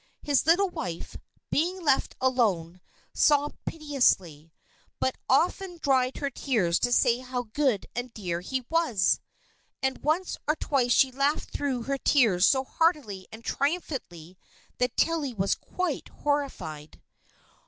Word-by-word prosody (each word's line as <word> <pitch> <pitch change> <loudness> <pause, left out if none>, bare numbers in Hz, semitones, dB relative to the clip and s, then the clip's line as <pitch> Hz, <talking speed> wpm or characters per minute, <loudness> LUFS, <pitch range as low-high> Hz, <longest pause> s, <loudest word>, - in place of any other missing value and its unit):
His 285 0 +2
little 365 +3 +4
wife, 170 - -5 0.4
being 355 +5 +1
left 270 -2 +2
alone, 195 -10 +1 0.3
sobbed 290 0 +2
piteously, 195 - 0 0.5
but 260 - 0
often 350 +6 +1
dried 265 -4 +1
her 280 -1 -2
tears 215 -11 +1
to 245 - 0
say 240 0 +3
how 250 -1 -4
good 265 -9 +1
and 245 +1 -4
dear 175 -6 -4
he 260 +6 -3
was! 320 - +2 0.6
and 265 0 -1
once 330 +5 0
or 305 - +3
twice 265 -6 0
she 265 +1 +5
laughed 275 +4 0
through 265 -4 -2
her 275 +2 -2
tears 215 -12 +4
so 265 -1 +3
heartily 265 - 0
and 225 +1 -11
triumphantly 260 - -3 0.4
that 250 -1 0
Tilly 305 -7 +1
was 195 -1 +1
quite 365 -6 -3
horrified. 275 - -3
260 Hz, 130 wpm, -27 LUFS, 215-295 Hz, 0.6 s, she